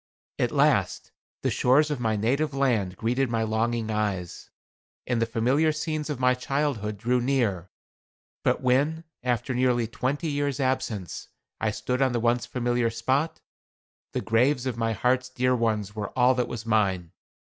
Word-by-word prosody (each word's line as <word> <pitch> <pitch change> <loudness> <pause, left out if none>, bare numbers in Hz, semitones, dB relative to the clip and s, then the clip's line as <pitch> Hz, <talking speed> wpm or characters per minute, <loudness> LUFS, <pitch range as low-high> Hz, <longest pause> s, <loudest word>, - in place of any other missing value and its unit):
At - - +1
last - - +1 0.3
the - - +1
shores 145 +5 +3
of 145 - -2
my 110 -2 0
native 135 +7 0
land 110 -9 +1
greeted 125 +3 0
my 115 -1 0
longing 110 0 -1
eyes, 100 -5 -3 0.6
and 120 -2 0
the 115 - +1
familiar 130 +7 +2
scenes 155 0 -3
of 145 -4 -3
my 125 0 +4
childhood 125 -5 -2
drew 120 +4 +1
near. 115 -9 0 0.7
But - - +1
when, 140 +6 +1 0.2
after 125 0 -1
nearly 125 -1 +2
twenty 130 +7 -2
years 145 -1 -1
absence, 130 -8 -2 0.3
I - - +1
stood 125 +1 -2
on 130 -2 +3
the 120 - +1
once 120 +1 +1
familiar 120 -1 0
spot, 140 +8 -1 0.7
the - - -1
graves 125 +4 +2
of 130 -3 -2
my 115 -1 0
heart's 125 +4 +1
dear 125 0 +1
ones 110 -4 -1
were 105 -2 -3
all 125 +1 +5
that 125 -1 0
was 115 -1 -6
mine. 95 -6 +1
125 Hz, 160 wpm, -26 LUFS, 110-130 Hz, 0.7 s, all